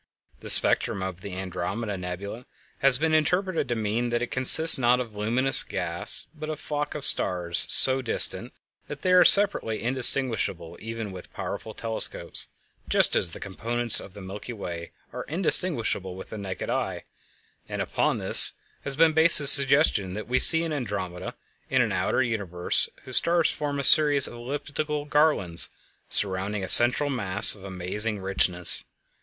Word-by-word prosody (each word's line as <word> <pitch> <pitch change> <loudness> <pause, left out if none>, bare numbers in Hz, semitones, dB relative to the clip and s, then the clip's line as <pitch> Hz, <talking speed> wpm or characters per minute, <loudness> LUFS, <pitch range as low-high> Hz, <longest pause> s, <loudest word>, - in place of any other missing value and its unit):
The - - -6
spectrum 95 - +3
of 95 -1 -8
the 95 -1 -9
Andromeda 95 +4 -6
Nebula 95 +6 -9 0.3
has 135 -2 +3
been 160 +2 -2
interpreted 170 +1 -2
to 120 - -2
mean 110 +2 -4
that 120 0 -3
it 120 - -8
consists 135 +5 +8
not 125 0 +1
of 115 -4 -8
luminous 120 +6 +4
gas, 90 +3 -1
but 155 -1 -10
of 155 - -6
a - - -19
flock 150 -1 -6
of 145 -2 -6
stars 85 -2 0
so 130 0 +7
distant 125 - -1 0.4
that 145 -1 -11
they 185 - 0
are 180 - +5
separately 200 - +3
indistinguishable 120 -8 -3
even 115 -2 -8
with 90 -1 -13
powerful 110 - -8
telescopes, 115 -1 -5 0.4
just - - +1
as 85 - -1
the - - -9
component 115 +4 -5
stars - - -3
of 95 - -24
the 100 - -12
Milky 100 +5 -10
Way 85 -5 -9 0.2
are - - -7
indistinguishable 145 - -4
with 95 - -12
the 110 - -8
naked 95 -4 -7
eye; - - -5 0.7
and - - -7
upon - - -2
this - - +6 0.3
has 140 - -1
been 160 +1 +2
based 160 +2 +5
the 150 - -2
suggestion 140 - +4
that 110 - -7
what - - -19
we 130 - +1
see 165 0 +3
in 165 -2 -5
Andromeda 100 -9 -7 0.3
is - - 0
an - - -1
outer 130 - -2
universe 100 -7 -2
whose 130 - -3
stars 170 -1 0
form 145 -1 -6
a - - -4
series 145 -1 +3
of - - -8
elliptical 145 +4 -6
garlands 145 - 0 0.4
surrounding 100 +1 +1
a - - -5
central 125 +7 +5
mass 105 -5 +1
of 100 - -17
amazing 100 +3 -3
richness. 95 -2 0
120 Hz, 170 wpm, -23 LUFS, 95-145 Hz, 0.7 s, consists